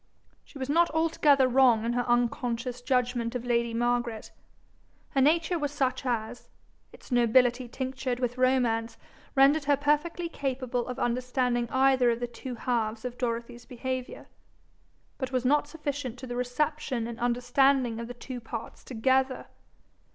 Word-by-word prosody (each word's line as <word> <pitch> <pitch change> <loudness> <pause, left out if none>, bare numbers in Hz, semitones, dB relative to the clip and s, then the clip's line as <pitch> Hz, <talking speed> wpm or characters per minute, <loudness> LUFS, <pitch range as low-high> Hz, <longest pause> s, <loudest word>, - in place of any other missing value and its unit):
She - - -14
was 260 -1 -4
not 335 +4 +3
altogether 300 -4 +4
wrong 250 -3 +4
in 235 - 0
her 245 0 -1
unconscious 240 0 0
judgment 245 -2 0
of 250 -1 -3
lady 235 -1 +1
Margaret. 240 -1 -1 0.8
Her 270 - +2
nature 330 +4 +2
was 290 -2 -2
such 265 -2 -1
as, 235 0 -3 0.4
its - - -16
nobility 245 +1 +3
tinctured 260 0 -3
with 245 -1 -1
romance, 245 -3 +1 0.4
rendered 280 +2 +5
her 285 -1 +3
perfectly 300 +4 0
capable 255 -5 -3
of 250 - -5
understanding 245 0 0
either 260 -1 +3
of 230 0 0
the 245 - -1
two 245 +1 -7
halves 225 -1 -2
of 245 0 -6
Dorothy's 235 0 -3
behaviour, 255 0 -5 0.9
but 260 -2 -3
was 255 -1 -1
not 290 +3 +3
sufficient 285 -5 -5
to 260 - -8
the 245 -1 -5
reception 250 0 -1
and 235 +1 -7
understanding 245 0 +2
of 235 - -5
the 245 - -8
two 250 +1 -7
parts 225 0 -7
together. 260 +2 0
250 Hz, 150 wpm, -28 LUFS, 240-270 Hz, 0.9 s, rendered